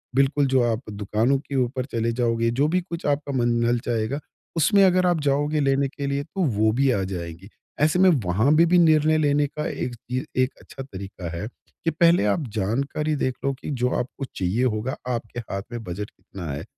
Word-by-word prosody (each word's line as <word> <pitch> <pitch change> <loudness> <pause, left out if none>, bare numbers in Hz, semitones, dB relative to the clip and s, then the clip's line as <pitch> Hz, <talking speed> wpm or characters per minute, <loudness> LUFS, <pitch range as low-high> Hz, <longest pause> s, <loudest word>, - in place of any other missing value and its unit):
बिल्कुल 140 +1 +3
जो 130 -1 +3
आप 110 +3 -2
दुकानों 105 +6 +1
के 140 0 -7
ऊपर 125 +1 -3
चले 115 -3 -1
जाओगे 115 -1 +1
जो 135 +5 +2
भी 180 +3 +1
कुछ 170 -1 -7
आपका 145 0 0
मन 120 -1 +2
ललचाएगा, 120 +2 0 0.4
उसमें 195 +6 +5
अगर 185 0 +3
आप 175 -3 +2
जाओगे 145 +2 +1
लेने 135 0 +2
के 140 +1 -5
लिए 140 +1 -1
तो 190 +5 -5 0.2
वो 110 0 +4
भी 135 +3 +2
आ 100 -5 0
जाएगी। 90 0 -6 0.3
ऐसे 155 +4 +3
में 190 0 +7 0.2
वहाँ 105 +10 +2
पे 170 - +6
भी 180 +2 +4
निर्णय 155 -1 +4
लेने 145 -1 +2
का 150 +1 -5
एक 120 -1 -4
चीज़ 125 +4 -4 0.2
एक 130 +2 +1
अच्छा 135 - -9
तरीका 95 -7 -7
है 105 +5 -4 0.4
कि 165 - +3
पहले 170 -4 +4
आप 105 +9 +1
जानकारी 140 +9 -1
देख 130 -3 -1
लो 140 - +2
कि 135 - -8
जो 125 -2 0
आपको 130 +2 -4
चाहिए 95 +7 0
होगा 120 +1 -1
आपके 120 -1 -3
हाथ 100 -4 -5
में 120 -1 -5
बजट 100 +3 -5
कितना 90 -5 -9
है? 70 - -5
130 Hz, 205 wpm, -24 LUFS, 110-145 Hz, 0.4 s, में